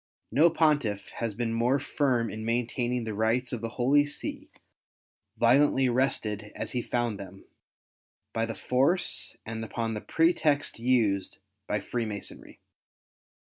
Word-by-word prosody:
No 160 +4 +5
Pontiff 150 -11 +1
has 115 -3 -2
been 115 0 -1
more 120 +4 +2
firm 130 -5 0
in 110 0 -6
maintaining 120 +1 -1
the 110 -1 -4
rights 115 +4 0
of 120 - -3
the 115 - -3
Holy 135 +4 +4
See, 145 - -5 0.9
violently 130 +3 +4
wrested 110 -5 -1
as - - -4
he 125 - -1
found 120 -3 -1
them, 95 0 -10 0.9
by 115 0 0
the 115 - -5
force 135 - +1
and 110 0 -5
upon 115 0 -3
the 105 - -4
pretexts 155 -6 +1
used 115 -6 +1 0.3
by 105 - -1
Freemasonry. 110 -2 -5
120 Hz, 135 wpm, -28 LUFS, 110-130 Hz, 0.9 s, No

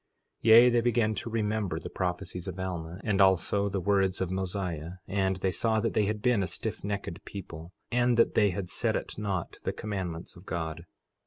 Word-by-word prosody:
4:21 115 - +3
Yea, 120 +2 +9
they 120 0 +3
began 115 -2 +2
to 110 - -5
remember 110 -3 -1
the - - -7
prophecies 90 0 -3
of 95 0 -5
Alma, 90 -1 -4
and 105 -2 +2
also 95 +2 +3
the 95 0 -1
words 95 0 +2
of 95 -1 -1
Mosiah; 90 -3 -3
and 95 0 +1
they 95 0 0
saw 110 +3 +1
that 115 +1 0
they 105 - +3
had 105 +1 -2
been 125 -5 +3
a 95 - 0
stiffnecked 100 -3 -4
people, 85 -4 -8 0.2
and 120 0 +3
that 115 - +4
they 105 -1 +4
had 90 0 -4
set - - 0
at - - -4
naught 100 -5 -3
the - - 0
commandments 95 -5 -5
of 90 +2 -15
God. 80 0 -4
95 Hz, 195 wpm, -29 LUFS, 90-105 Hz, 0.2 s, Yea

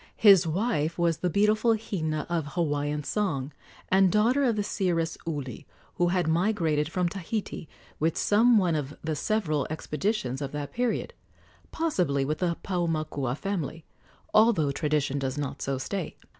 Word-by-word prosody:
His 195 -5 +7
wife 170 -3 0
was 170 -2 +2
the 180 - -1
beautiful 215 +5 +3
Hina 155 -8 -3
of 165 -4 -2
Hawaiian 150 -3 -1
song 155 -7 -1 0.4
and 190 -1 +4
daughter 235 +7 +3
of 235 -3 +2
the 205 - 0
seeress 175 -5 -1
Uli, 140 -7 -5 0.3
who 175 - +3
had 175 -1 +1
migrated 160 -4 +1
from 180 +1 0
Tahiti 195 -1 -4 0.3
with 160 +1 +1
some 230 +3 +4
one 180 -5 +2
of 145 -2 -3
the 155 -1 -1
several 155 -4 0
expeditions 150 - -2
of 140 0 -4
that 145 -1 -5
period 245 -1 -1 0.6
possibly 180 - 0
with 155 +2 -2
the 170 -2 0
Paumakua 155 -8 -1
family, 165 -5 -4 0.5
although 215 -10 +4
tradition 145 -1 0
does 135 0 -3
not 145 -2 -4
so 135 -1 -1
state. 170 +6 -4
165 Hz, 150 wpm, -27 LUFS, 150-200 Hz, 0.6 s, His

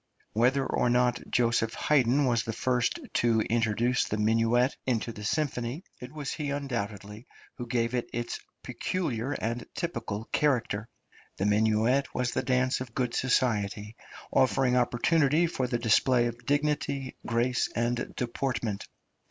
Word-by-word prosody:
Whether 130 +5 +3
or 125 - +1
not 125 0 +2
Josef 115 -2 +1
Haydn 140 -1 +3
was 120 -3 +2
the 115 - -4
first 125 +1 0 0.2
to 115 -2 +3
introduce 115 +2 +1
the 105 - -2
minuet 115 +4 +2
into 120 -2 0
the 105 -2 -9
symphony, 130 - -2 0.2
it 125 0 -9
was 150 -2 -4
he 150 -2 -3
undoubtedly 110 -6 -4 0.3
who 120 - -5
gave 115 0 0
it 125 -1 -2
its 120 0 -3 0.2
peculiar 145 -8 -2
and 115 0 -3
typical 115 - -3
character. 120 -7 0 0.5
The 95 - -1
minuet 110 +6 +2
was 125 -1 0
the - - 0
dance 130 0 +1
of 120 -3 -7
good 125 -2 0
society, 105 -5 0 0.4
affording 125 +1 +3
opportunity 140 +6 +3
for 135 -6 -1
the 120 -1 0
display 120 +2 +3
of 120 0 -5
dignity, 145 -2 0
grace, 120 +1 +1
and 120 +1 -1
deportment. 120 -4 -2
120 Hz, 140 wpm, -28 LUFS, 115-130 Hz, 0.5 s, Whether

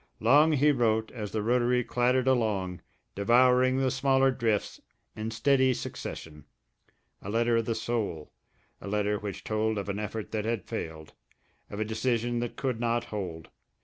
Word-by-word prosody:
Long 145 +7 +5
he 150 +1 +4
wrote 110 -4 +1
as 105 -5 -6
the 110 -1 -2
rotary 125 +1 +2
clattered 125 +2 +1
along, 105 -8 0 0.3
devouring 125 +5 +4
the 135 -1 +1
smaller 135 0 +3
drifts 115 -5 -1 0.3
in 110 +1 -4
steady 130 +2 +2
succession, 75 -8 -7 0.8
a 95 - -7
letter 115 +2 +2
of 115 - 0
the 115 - -1
soul, 110 -9 -3 0.5
a - - -8
letter 105 0 0
which 100 -2 -6
told 110 0 -1
of 100 0 -4
an 100 +1 -2
effort 105 +1 -5
that 110 -1 -2
had 115 -2 -2
failed, 80 -1 -6 0.6
of 100 - -6
a 110 - 0
decision 120 +2 -1
that 120 -1 -4
could 130 -4 -2
not 120 0 0
hold. 85 -6 -5
115 Hz, 160 wpm, -28 LUFS, 105-125 Hz, 0.8 s, Long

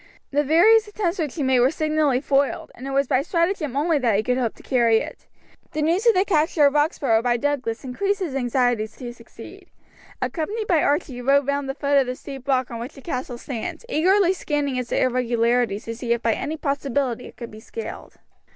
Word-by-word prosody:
The 290 +1 +2
various 420 +10 +5
attempts 400 -4 -2
which 300 -5 -2
he 305 - -2
made 260 -1 +3
were 250 +2 +5
signally 305 -4 +1
foiled, 280 -1 0
and 260 - -9
it - - -4
was 275 +1 +2
by 260 0 +2
stratagem 335 -3 -1
only 310 +1 +2
that 235 -5 +2
he 210 - +1
could 250 +2 0
hope 235 -3 -1
to - - -17
carry 235 -4 +3
it. - - -6 0.5
The 305 - -1
news 350 +9 +1
of 460 - +6
the 375 +2 +3
capture 310 -4 +3
of 280 - +4
Roxburgh 290 -6 +2
by 240 -1 +2
Douglas 260 -3 -2
increased 395 +11 -1
his 350 -8 -3
anxiety 245 -3 +1
to 240 +2 -9
succeed. - - -13 0.5
Accompanied 415 +7 -3
by 340 -6 +2
Archie 290 0 0
he 245 - -7
rode 275 +2 +3
round 280 0 -1
the 270 - -3
foot 285 -1 +2
of 265 - +1
the 250 - -3
steep 270 0 -10
rock 260 -2 +1
on 230 - -5
which 245 +5 -7
the 275 - -12
castle 255 -4 -4
stands, 240 - -6
eagerly 375 +1 +3
scanning 290 -7 -2
its 250 -1 -4
irregularities 240 -3 +1
to 230 - -5
see 235 0 -1
if 235 - -4
by 230 - +2
any 310 +7 -4
possibility 275 -4 -2
it - - -15
could 235 -1 -8
be 215 - -11
scaled. 455 - -8
275 Hz, 215 wpm, -23 LUFS, 245-310 Hz, 0.5 s, of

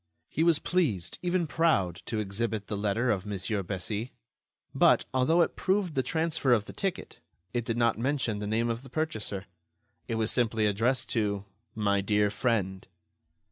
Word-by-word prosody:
He 160 - 0
was 165 -2 +5
pleased, 130 - 0
even 180 -1 +1
proud, 100 - +1
to 110 - -2
exhibit 105 +1 -1
the 105 - -3
letter 105 +4 +1
of 95 -3 -1
Mon. 105 -1 -4 0.2
Bessy, 100 +5 -4 0.6
but, - - +4
although 130 +7 +4
it - - -3
proved 190 -3 0
the 135 - +2
transfer 160 -3 +1
of 105 -4 +2
the - - -9
ticket, 195 -2 -3 0.3
it 120 -1 0
did 115 0 -1
not 115 -2 +2
mention 125 -4 0
the 105 - -3
name 115 +2 +1
of 115 +1 -4
the 135 - -13
purchaser. 110 -10 -3 0.6
It 115 - -2
was 110 -1 0
simply 115 -3 +1
addressed 115 +6 +1
to 100 -3 0 0.3
"My 100 -2 +2
Dear 105 +1 +2
Friend." 100 -6 -1
115 Hz, 170 wpm, -29 LUFS, 105-135 Hz, 0.6 s, was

